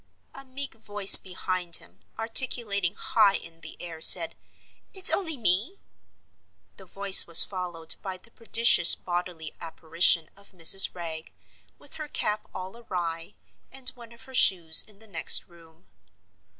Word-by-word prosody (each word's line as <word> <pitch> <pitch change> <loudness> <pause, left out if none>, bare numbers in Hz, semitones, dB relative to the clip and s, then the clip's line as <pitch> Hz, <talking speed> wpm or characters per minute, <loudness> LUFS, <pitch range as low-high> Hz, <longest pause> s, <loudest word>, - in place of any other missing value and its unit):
A 275 - -12
meek 275 +1 -10
voice, 205 -3 +6
behind 180 -2 0
him, 90 +3 -12 0.2
articulating 225 -5 -1
high 200 -1 -1
in 165 0 -11
the - - -13
air, 165 -2 -10
said, 165 0 +4 0.6
"It's 380 -1 +3
only 325 -7 -3
me." 215 - -1 1.0
The 190 - -16
voice 195 +1 +3
was 170 - +6
followed 175 -4 -7
by 190 -2 -8
the 230 +5 -18
prodigious 230 -6 +2
bodily 175 -3 -8
apparition 165 0 -1
of 200 0 -17
Mrs. 185 +3 +3
Wragge, 165 -2 -9 0.5
with 285 - -13
her 305 - -8
cap 210 -6 -5
all 185 +3 -10
awry, 175 -6 -8 0.4
and 265 -1 -2
one 240 -3 -17
of 235 - -18
her 265 - -17
shoes 170 -9 +2
in 210 -2 -20
the 220 - -15
next 170 -6 +1
room. 165 -1 -23
185 Hz, 145 wpm, -24 LUFS, 170-225 Hz, 1.0 s, voice